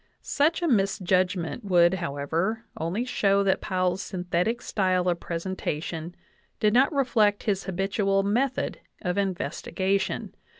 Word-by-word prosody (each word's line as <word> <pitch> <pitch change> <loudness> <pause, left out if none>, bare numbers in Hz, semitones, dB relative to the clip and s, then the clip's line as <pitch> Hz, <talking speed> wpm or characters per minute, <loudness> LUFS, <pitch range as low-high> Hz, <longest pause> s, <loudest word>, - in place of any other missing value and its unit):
Such 315 +5 +1
a - - +2
mis 200 -8 +2
judgment 185 +1 0
would, 175 -3 +4
however, 170 +6 -2
only 180 +9 -2
show 200 -5 +2
that 195 -1 +1
Powell's 185 -1 0
synthetic 180 +4 -1
style 185 -3 +1
of 175 -1 +1
presentation 165 -1 -4 0.4
did 210 -1 +3
not 260 +6 +5
reflect 230 -8 +2
his 195 -4 -1
habitual 195 +1 0
method 245 +7 0 0.2
of 180 +1 0
investigation. 195 0 -1
195 Hz, 125 wpm, -26 LUFS, 180-210 Hz, 0.4 s, not